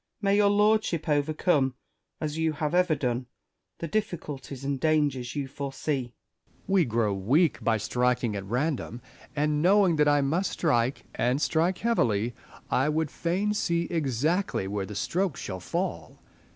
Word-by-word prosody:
May 200 -2 +2
your 205 -1 +5
lordship 210 -5 +2
overcome, 150 -2 +1 0.4
as 155 -1 -3
you 160 -1 0
have 150 0 -2
ever 180 -3 +3
done, 125 -2 -2 0.5
the 165 - -4
difficulties 150 - -4
and 140 -1 -1
dangers 145 -5 +1
you 140 -2 -2
foresee. 140 +1 -3 0.5
Essex. - - -34
We 190 -3 +3
grow 115 -3 0
weak 130 - +2
by 115 -1 +2
striking 125 0 0
at 100 - -4
random; 125 +2 -2 0.3
and 150 0 +1
knowing 185 -1 +4
that 150 0 +4
I 145 0 +4
must 165 +8 0
strike, 130 -5 +1
and 125 +3 +1
strike 165 +4 +1
heavily, 120 - +1 0.4
I 135 +4 +2
would 155 -1 0
fain 190 +5 -1
see 170 -4 0
exactly 155 - 0
where 100 -1 -3
the 105 - -7
stroke 175 - -1
shall 95 -2 -5
fall. - - -4
150 Hz, 150 wpm, -27 LUFS, 125-170 Hz, 0.5 s, your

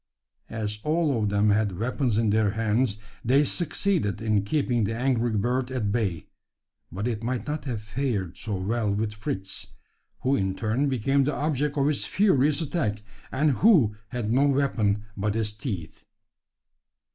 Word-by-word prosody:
As 105 -2 -3
all 150 -6 +1
of 105 - +1
them 105 +1 +3
had 105 -3 +1
weapons 120 +1 0
in 110 -2 +2
their 110 -1 +3
hands, 110 +1 0 0.3
they 135 +5 +4
succeeded 165 - 0
in 110 -2 +1
keeping 120 0 +1
the 110 +2 -1
angry 120 -2 +1
bird 125 +4 0
at 120 -6 -1
bay, 100 -7 -1 0.7
but 100 +6 -3
it 115 -3 -2
might 125 +1 -2
not 150 -1 -4
have 115 -6 -3
fared 110 -6 -2
so 105 -3 -4
well 105 +3 -1
with 105 +1 -1
Fritz 95 -3 -5 0.5
who 135 +2 +2
in 95 -3 0
turn 115 +7 0
became 135 +2 +2
the 145 +1 0
object 150 0 -1
of 140 0 +3
its 150 -2 +1
furious 150 -7 +3
attack, 110 -10 -2 0.3
and 150 +3 +2
who 155 - +5
had 115 -2 -2
no 140 +3 +4
weapon 115 -7 +1
but 105 +1 -1
his 110 -2 -1
teeth. 105 - -6
115 Hz, 160 wpm, -26 LUFS, 105-140 Hz, 0.7 s, who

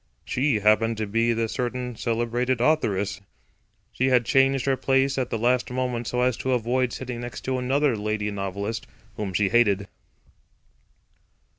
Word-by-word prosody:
She 125 -5 +1
happened 110 +2 +3
to 110 - -1
be 115 +3 +1
the 115 0 0
certain 125 0 -3
celebrated 120 +2 -1
authoress; 105 -9 +1 0.7
she 130 - 0
had 125 -2 +3
changed 135 0 +3
her 135 -1 +2
place 135 +1 +1
at 125 - -1
the - - -1
last 125 +2 +1
moment 125 -2 -2
so 125 - -1
as 125 -1 +2
to 130 - -1
avoid 125 +1 0
sitting 125 -1 -5
next 120 0 -6
to 130 -1 -2
another 135 +1 +1
lady 105 0 -2
novelist, 100 +3 -4 0.3
whom 105 -3 -3
she 100 +1 +1
hated. 100 -4 +3
120 Hz, 155 wpm, -25 LUFS, 110-130 Hz, 0.7 s, happened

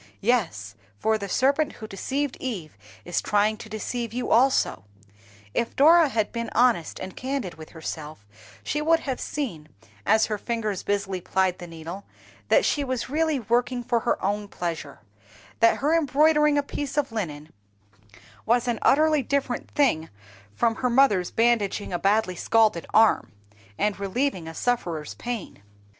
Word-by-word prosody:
Yes, 170 - 0 0.2
for 220 - +1
the 200 -1 -5
serpent 280 +7 +2
who 220 - -9
deceived 270 +7 -3
Eve 185 - -5 0.3
is 175 - -1
trying 210 +1 +2
to 220 - -10
deceive 225 +1 -4
you 250 +1 -3
also. 240 - +3 0.7
If 235 - -1
Dora 320 +2 +6
had 220 -5 -1
been 235 -1 -4
honest 235 -9 +2
and 185 0 -7
candid 260 -8 -3
with 155 -1 -12
herself, 155 -7 -7 0.4
she 300 - -2
would 330 +2 +3
have 265 -3 -4
seen, 190 - -4 0.3
as 220 +1 +4
her 210 -1 -3
fingers 215 -5 -2
busily 195 -2 -2
plied 190 0 0
the 175 - -8
needle, 165 +4 -8 0.5
that - - +4
she 290 - +1
was 255 -1 -3
really 310 -1 +1
working 245 +3 0
for 235 0 +1
her 235 - 0
own 205 +1 -1
pleasure; 170 -7 -5 0.6
that 230 0 +5
her 295 +3 +1
embroidering 300 0 +3
a 285 - +2
piece 280 0 -5
of 280 -4 +1
linen 155 -9 -5 0.9
was 240 +2 +2
an 235 -3 0
utterly 305 +1 +4
different 265 -1 -2
thing 200 - +1 0.5
from 230 -1 +1
her 250 - 0
mother's 235 -8 +3
bandaging 225 -4 +1
a 175 - -1
badly 200 -2 +2
scalded 215 -2 +2
arm, 220 0 +4 0.5
and 210 -1 0
relieving 200 -2 -1
a 165 - -8
sufferer's 175 -11 -2
pain. 235 - -6
225 Hz, 155 wpm, -25 LUFS, 190-265 Hz, 0.9 s, Dora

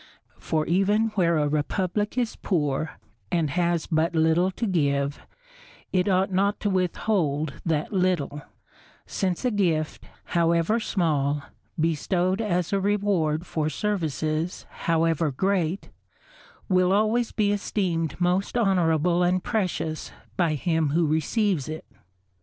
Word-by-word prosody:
For 155 -1 -1
even 205 +5 +2
where 175 -6 +2
a 150 -1 +2
republic 185 - -1
is 240 -3 0
poor, 150 -4 -1 0.4
and 160 -4 +1
has 170 -1 +1
but 165 +2 0
little 160 +3 +3
to 210 +5 -3
give, 140 -7 0 0.7
it 185 +1 +2
ought 190 +1 +2
not 200 +2 +1
to 205 - 0
withhold 175 -5 0
that 155 +3 -1
little; 180 -6 0 0.6
since 185 +3 -2
a 250 - +2
gift, 170 -7 0 0.2
however 170 +6 +2
small, 150 -9 0 0.4
bestowed 175 +5 +1
as 180 -4 -1
a 200 - +3
reward 195 -6 +1
for 155 -3 -1
services 160 -4 -2
however 165 -1 +1
great, 190 +3 -1 0.8
will 185 -1 +3
always 220 +3 +2
be 205 -2 +1
esteemed 180 -6 -1
most 180 +5 +1
honourable 175 -5 +2
and 180 +1 +2
precious 180 -7 -2 0.2
by 170 -4 +1
him 160 +1 0
who 165 +3 +2
receives 160 - 0
it. 155 0 -6
175 Hz, 125 wpm, -25 LUFS, 155-195 Hz, 0.8 s, little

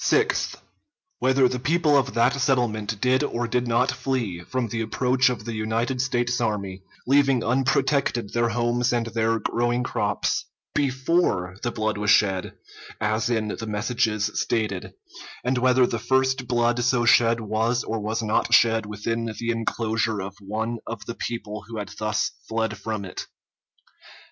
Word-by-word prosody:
Sixth. - - +1 0.6
Whether 130 0 +4
the 125 0 -3
people 155 +3 +2
of 135 -3 +1
that 120 +3 +4
settlement 110 -6 0
did 130 +1 +3
or 120 -4 -2
did 125 +1 0
not 120 +3 +2
flee 120 -10 -2
from 120 +7 -3
the 115 +2 -2
approach 125 +3 +2
of 110 -4 -4
the 115 - -4
United 115 +4 -1
States 125 -2 0
army, 100 -4 -2 0.2
leaving 135 -2 +3
unprotected 130 -2 +1
their 120 0 +2
homes 120 +1 +1
and 120 -1 0
their 115 0 0
growing 120 +3 0
crops, - - -1 0.3
before 130 - +1
the 120 - -1
blood 110 -2 -2
was 105 -1 0
shed, 95 -3 +3 0.5
as 110 +1 0
in 110 -3 0
the 110 +2 -5
messages 110 0 0
stated; 105 -5 -1 0.5
and 125 0 +1
whether 125 0 +4
the 115 - -2
first 130 +1 +1
blood 120 -1 +2
so 125 -1 +2
shed 115 -1 +5
was 115 +3 0
or 115 - -3
was 110 +2 -2
not 110 +2 +3
shed 115 -3 +3
within 115 +3 -3
the 120 0 -1
inclosure 115 -1 -1
of 95 0 -5
one 110 +4 -3
of 115 -4 -6
the 115 - -4
people 110 -3 -5
who 115 -1 -7
had 105 -2 -4
thus 110 0 0 0.2
fled 110 -1 -1
from 105 0 -4
it. 95 - -7
115 Hz, 160 wpm, -24 LUFS, 110-125 Hz, 0.6 s, shed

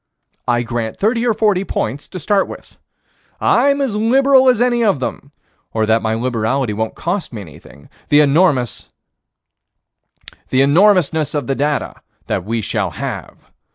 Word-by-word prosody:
I 120 -1 +1
grant 115 -1 -4
thirty 230 +3 0
or 225 - +2
forty 205 -3 +1
points 140 - -3
to - - -8
start 195 +4 +1
with. - - -12 0.6
I'm 280 0 +2
as 260 -7 -1
liberal 260 +4 +4
as 250 -3 +2
any 240 -1 +2
of 200 -10 +2
them 135 +2 -5 0.4
or 110 -1 +1
that 110 +1 +2
my 110 0 -1
liberality 120 0 -1
won't 110 +1 -3
cost 180 +2 -3
me 110 -4 -7
anything 75 -4 -14 0.2
the 145 0 +6
enormousness 145 - +2 2.5
of 145 - -1
the 135 - -1
data 145 +2 -2 0.2
that 95 - -2
we 115 +3 -2
shall - - -1
have. - - -7
145 Hz, 145 wpm, -17 LUFS, -, 2.5 s, the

